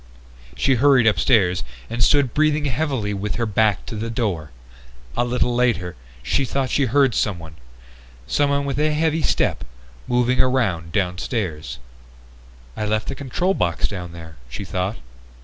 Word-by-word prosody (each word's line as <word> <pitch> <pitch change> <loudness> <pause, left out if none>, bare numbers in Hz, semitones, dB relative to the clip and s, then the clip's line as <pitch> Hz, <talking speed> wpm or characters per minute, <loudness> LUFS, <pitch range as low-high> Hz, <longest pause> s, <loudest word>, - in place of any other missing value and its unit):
She 100 - +2
hurried 130 -1 +5
upstairs 100 -6 +3 0.2
and 115 +1 0
stood 140 -3 +3
breathing 155 -1 +2
heavily 130 -6 -1
with 100 -1 -3
her 115 - 0
back 105 -1 +1
to - - -6
the 110 +2 -3
door. 100 - -2 0.7
A - - +2
little 120 0 0
later 115 -8 +1 0.3
she 135 - +1
thought 135 -1 -1
she 140 - +2
heard 135 0 +3
someone 85 -7 -2 0.7
someone 140 - +1
with 140 0 -2
a 155 0 +2
heavy 160 +1 +1
step - - +1 0.4
moving 125 +1 +2
around 105 -11 0
downstairs. 90 - -2 1.0
"I 105 - -2
left 110 0 -1
the - - -2
control 145 +8 -1
box 85 - 0
down 90 -4 -6
there," 80 -2 -11
she 100 - -6
thought. 95 +4 -2
115 Hz, 150 wpm, -22 LUFS, 90-135 Hz, 1.0 s, hurried